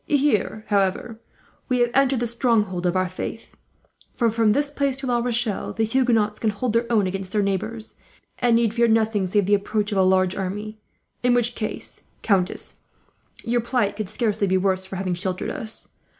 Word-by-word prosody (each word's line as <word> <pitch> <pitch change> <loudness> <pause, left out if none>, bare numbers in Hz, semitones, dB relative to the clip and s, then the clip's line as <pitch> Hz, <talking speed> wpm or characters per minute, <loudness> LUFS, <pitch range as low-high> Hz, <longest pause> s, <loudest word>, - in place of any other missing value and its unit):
"Here, 265 -7 +1
however, 205 +3 0 0.5
we 250 - +2
have 240 0 +2
entered 270 -2 +3
the - - +1
stronghold 220 -7 +1
of 175 - 0
our 185 0 +2
faith; 185 +5 -7 0.6
for 230 -2 +2
from 225 -1 +3
this 285 +3 0
place 280 -2 0
to 270 - -5
La 245 -2 +1
Rochelle, 235 -3 -1
the 225 - 0
Huguenots 225 -3 +1
can 220 - +1
hold 215 +3 -2
their 230 +1 0
own 215 -4 +3
against 190 0 -4
their 210 -1 +2
neighbours, 215 +3 -3 0.4
and 240 -2 +3
need 230 -2 +2
fear 235 0 +3
nothing 220 -3 +2
save 205 +1 +2
the 205 - +2
approach 205 +1 0
of 200 - +1
a - - +5
large 185 0 +3
army; 210 +3 -4 0.4
in 245 0 +3
which 240 0 +1
case, 215 -2 -6 0.2
countess, 190 -4 0 0.7
your 240 +1 +1
plight 235 -4 0
could 210 -3 -4
scarcely 215 -2 0
be 190 0 +2
worse 190 0 0
for 190 - -7
having 185 -1 -2
sheltered 185 +1 -3
us. 225 -7 -2
215 Hz, 190 wpm, -23 LUFS, 195-235 Hz, 0.7 s, a